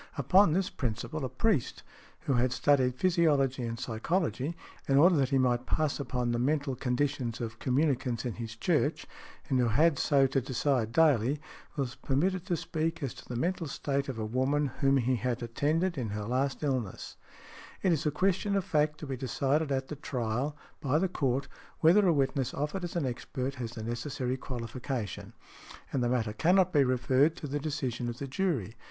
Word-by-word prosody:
Upon 175 +5 +5
this 190 +2 0
principle, 135 +3 -3
a 130 - -2
priest 210 - 0 0.4
who 140 - 0
had 125 0 +2
studied 130 -1 +2
physiology 145 -6 +2
and 115 0 -5
psychology, 155 +5 -1 0.3
in 135 - +3
order 175 +5 +6
that 135 -2 +2
he 135 - +2
might 125 -1 +1
pass 155 +1 0
upon 125 -3 -1
the 120 - 0
mental 140 +1 0
conditions 125 -1 -1
of 115 -1 -5
communicants 130 -3 0
in 120 - -2
his 115 0 -6
church, 150 +4 0 0.4
and 130 -3 +1
who 125 - +3
had 145 +6 +3
so 140 -2 +4
to 135 0 +1
decide 130 -2 0
daily, 145 -2 +3 0.4
was 135 -4 -2
permitted 180 +7 -1
to 175 -4 0
speak 160 0 -2
as 135 - -2
to - - -14
the 125 - -4
mental 170 +5 -1
state 140 0 -2
of 130 - -4
a 110 - -2
woman 130 +5 0
whom 135 -1 +4
he 130 0 +1
had 120 +2 -2
attended 155 +8 0
in 115 -4 -2
her 105 +1 -3
last 130 +5 -1
illness. 130 -9 -2 0.7
It 190 - +4
is 160 -4 +1
a 150 - +2
question 195 +5 +1
of 195 -3 0
fact 150 -4 +1
to - - -4
be 135 -2 -3
decided 140 +4 0
at 135 -1 -1
the 150 - -4
trial, 130 +1 -2 0.2
by 145 -1 +1
the 190 +3 +1
Court, 135 -5 0 0.3
whether 185 +5 +6
a - - +5
witness 135 -2 0
offered 150 +6 -2
as 175 - -5
an 170 -5 0
expert 130 +2 -3
has 115 -1 -4
the 110 -2 -6
necessary 125 +2 -2
qualification. 125 -3 -5 0.6
And 135 - +1
the 120 - +1
matter 115 -4 0
cannot 180 - +3
be 145 -3 +5
referred 130 +4 +2
to 155 - -6
the 145 +1 -2
decision 135 -5 -3
of 120 - -5
the 140 - -5
jury. 135 - -1
135 Hz, 190 wpm, -30 LUFS, 125-155 Hz, 0.7 s, order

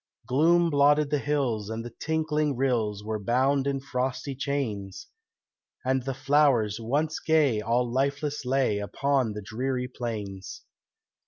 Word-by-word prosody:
Gloom 170 +5 +3
blotted 145 +1 +4
the 150 - +2
hills 130 -8 -1
and 110 +1 -4
the 120 - -7
tinkling 155 +1 -1
rills 115 -6 0
Were 110 0 -3
bound 135 +4 +2
in 140 -1 0
frosty 130 +1 -3
chains, 125 -9 -3 0.8
And 130 0 +2
the 135 -1 -2
flowers 135 -7 +2
once 145 +7 -1
gay 150 -9 +2
all 120 +3 +1
lifeless 140 +4 -1
lay 125 -5 +1
Upon 130 +2 0
the 105 0 -6
dreary 125 +4 -2
plains. 105 -6 -6
130 Hz, 135 wpm, -27 LUFS, 115-145 Hz, 0.8 s, blotted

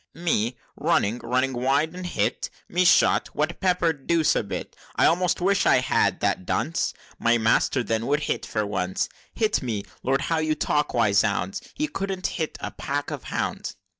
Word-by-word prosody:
"Me! 125 -9 0 0.2
running 110 +4 +1
running 130 +2 0
wide 135 +6 +1
and 180 0 -6
hit! - - -1 0.2
Me 180 +1 +1
shot! 175 - +4
what, 155 +3 -1
pepper'd? 170 -6 0
Deuce 160 -3 +3
a - - +2
bit! 100 - -6 0.2
I - - +4
almost 175 +1 +2
wish 195 +2 +2
I - - +6
had! 125 0 +1
That - - 0
Dunce, 165 - -1 0.2
My 120 0 +3
master, 115 +3 +2
then 115 0 -1
would 145 +2 +1
hit - - -2
for 105 -1 -2
once! 95 -2 -1 0.3
Hit 220 -1 +1
me! 110 -6 -3 0.2
Lord, 135 +2 +1
how 165 -1 0
you 155 -1 +1
talk! 150 -1 0
why, 115 -4 +3
zounds! 100 -2 +1
He 305 +2 -1
couldn't 195 -6 -4 0.2
hit 160 - -3
a - - -4
pack 145 +2 -3
of 145 -5 -6
hounds!" - - -3
145 Hz, 180 wpm, -25 LUFS, 115-170 Hz, 0.3 s, I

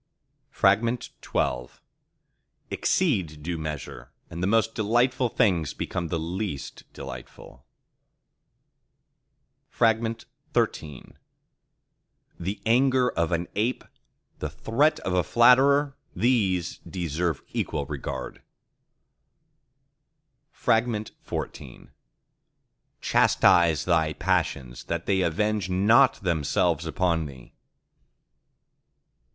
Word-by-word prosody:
XII 100 - 0 1.0
Exceed 95 - 0
due 85 +1 -3
measure, 75 -5 -6 0.2
and 85 - -6
the 90 - +1
most 115 +1 +2
delightful 120 +3 +1
things 85 -10 +1
become 85 -1 -3
the 85 - -2
least 85 -1 -5
delightful. 65 0 -10 2.1
XIII 115 0 +2 2.2
The 95 +5 -4
anger 125 +2 +3
of 85 +1 -1
an 85 0 -1
ape—the 115 +5 -5
threat 145 +8 +1
of 95 - -2
a 90 - +3
flatterer:—these 125 - +2
deserve 85 -3 -3
equal 75 -3 -2
regard. 70 -2 -6 2.1
XIV 110 -2 -2 1.1
Chastise 85 -3 +4
thy 80 -3 +2
passions 80 -9 -1
that 85 0 -3
they 95 -2 +2
avenge 105 +4 0
not 110 +8 +5
themselves 80 -6 0
upon 85 -4 0
thee. 65 -4 -13
90 Hz, 75 wpm, -26 LUFS, 80-115 Hz, 2.2 s, not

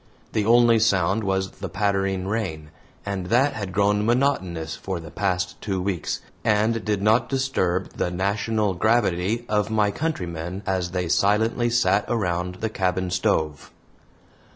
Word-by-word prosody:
The 105 -1 0
only 120 -1 +5
sound 100 -1 +2
was 95 -1 -1
the 100 - -7
pattering 95 0 0
rain, 90 -8 -3 0.3
and 100 -3 -3
that 125 +8 +3
had 100 -4 -5
grown 105 +2 +2
monotonous 95 - 0
for 95 +1 -4
the 80 -1 -10
past 90 -2 -2
two 95 -3 -2
weeks, 90 -3 -2 0.2
and 110 +1 +2
did 105 -2 -1
not 110 +3 +3
disturb 115 -10 -1
the - - 0
national 100 +3 0
gravity 110 +1 +1
of 105 0 0
my 105 -2 +2
countrymen 90 - -4
as 95 -2 -1
they 90 -1 -2
silently 110 +6 +2
sat 115 -4 +2
around 90 -5 -1
the 110 - 0
cabin 95 -2 -1
stove. 75 -4 0
100 Hz, 145 wpm, -24 LUFS, 90-110 Hz, 0.3 s, only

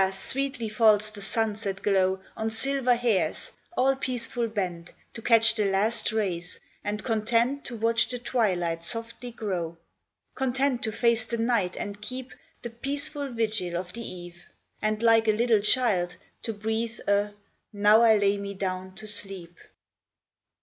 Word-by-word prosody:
sweetly 255 +5 -2
falls 215 -1 +4
the 205 -1 -10
sunset 205 -2 -2
glow 190 -2 +2 0.2
On 220 0 -1
silver 255 +2 +1
hairs, 235 -5 0 0.3
all 270 +1 +4
peaceful 245 -2 -2
bent 180 -6 -3 0.2
To 230 - -8
catch 225 -1 +5
the 215 -2 0
last 210 +4 +1
rays, 185 -5 -2 0.2
and 210 +1 -3
content 235 +4 +1
To 245 - -5
watch 230 +1 +2
the 250 - -3
twilight 180 -9 0
softly 230 +5 -5
grow; 180 -8 -3 0.6
Content 265 0 0
to 220 - -1
face 230 0 +2
the 235 0 -3
night 225 -6 +1
and 205 0 -5
keep 255 +4 -6 0.3
The 235 - -5
peaceful 285 +3 -2
vigil 215 -7 -1
of 180 0 -5
the 235 - -6
eve, 175 -4 -9 0.3
And 215 +1 0
like 225 -1 +5
a 215 - +5
little 230 0 +3
child 205 -6 +2 0.3
to 230 - -3
breathe 220 +2 -2
A 205 +1 +2 0.2
" - - -49
Now 210 +1 +5
I 225 -2 +6
lay 200 0 +2
me 200 0 -5
down 185 -1 -3
to 215 +2 -9
sleep." 195 -4 -5
220 Hz, 155 wpm, -27 LUFS, 200-235 Hz, 0.6 s, I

